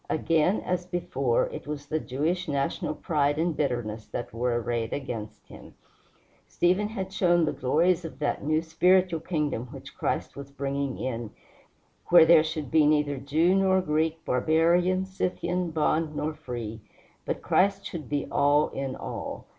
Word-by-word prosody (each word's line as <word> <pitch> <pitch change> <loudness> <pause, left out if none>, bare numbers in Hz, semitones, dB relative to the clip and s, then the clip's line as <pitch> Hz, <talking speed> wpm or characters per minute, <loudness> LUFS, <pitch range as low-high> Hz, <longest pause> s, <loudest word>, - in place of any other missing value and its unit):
Again, 165 +4 +2
as 180 -1 -2
before, 135 -9 0
it - - -8
was 145 -1 -5
the 155 +2 -1
Jewish 160 +8 -2
national 140 +1 -1
pride 145 -3 0
and 165 0 0
bitterness 120 -7 -2
that 120 - -6
were 120 +1 0
arrayed 115 -1 -2
against 110 -6 -6
him. - - -13 0.7
Stephen 185 +4 +1
had 195 -3 -5
shown 175 -3 +3
the 150 - 0
glories 165 +7 +1
of 165 - -8
that 150 - -2
new 155 +2 +1
spiritual 180 +1 +3
kingdom 150 -7 -2
which 135 +1 -11
Christ - - -2
was 140 0 -8
bringing 140 -1 -3
in, 120 -3 -4 0.8
where 170 -2 +8
there 160 -1 +7
should 155 -3 -4
be 155 -2 +5
neither 150 -2 +2
Jew 155 +7 +2
nor 190 -1 +3
Greek, 160 -1 -1
barbarian, 170 +7 +2
Scythian, 180 -2 -2
bond 155 0 0
nor 155 +1 -2
free, 115 -6 -6 0.4
but - - -4
Christ 195 +1 +2
should 165 -3 -6
be 145 -1 -1
all 145 +1 +3
in 135 -1 -4
all. - - -6
155 Hz, 155 wpm, -27 LUFS, 140-175 Hz, 0.8 s, where